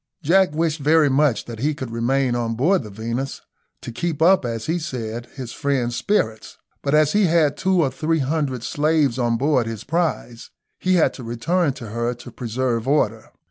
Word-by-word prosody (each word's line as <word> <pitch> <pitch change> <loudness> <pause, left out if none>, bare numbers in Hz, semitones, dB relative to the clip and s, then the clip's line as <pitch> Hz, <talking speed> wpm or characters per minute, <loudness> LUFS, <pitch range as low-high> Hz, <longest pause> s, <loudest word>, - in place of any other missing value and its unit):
Jack 185 +1 +3
wished 160 -1 0
very 150 +1 +4
much 135 -4 +2
that 115 -2 -8
he 150 +4 0
could 130 -5 -6
remain 125 +2 +1
on 115 -1 -1
board 170 +11 +2
the 110 - -9
Venus, 115 +6 -4 0.4
to - - -7
keep 160 +5 -3
up, 175 -2 +4
as 115 -2 -3
he 170 +2 0
said, 120 -7 -5
his 130 -4 -7
friends' 130 -5 -1
spirits, 110 - -1 0.2
but 140 +1 +1
as 155 -1 +3
he 205 -1 +4
had 160 -4 +3
two 190 -2 +2
or 135 - 0
three 160 +4 0
hundred 140 -4 -1
slaves 145 -4 +1
on 120 -1 +1
board 130 -2 +1
his 115 -1 -5
prize, 160 -9 -2 0.3
he 185 0 +2
had 170 - +3
to 130 - -9
return 140 +8 0
to 115 -4 -9
her 115 +2 -2
to 120 +1 -12
preserve 120 0 -2
order. 115 -6 0
135 Hz, 190 wpm, -22 LUFS, 115-160 Hz, 0.4 s, very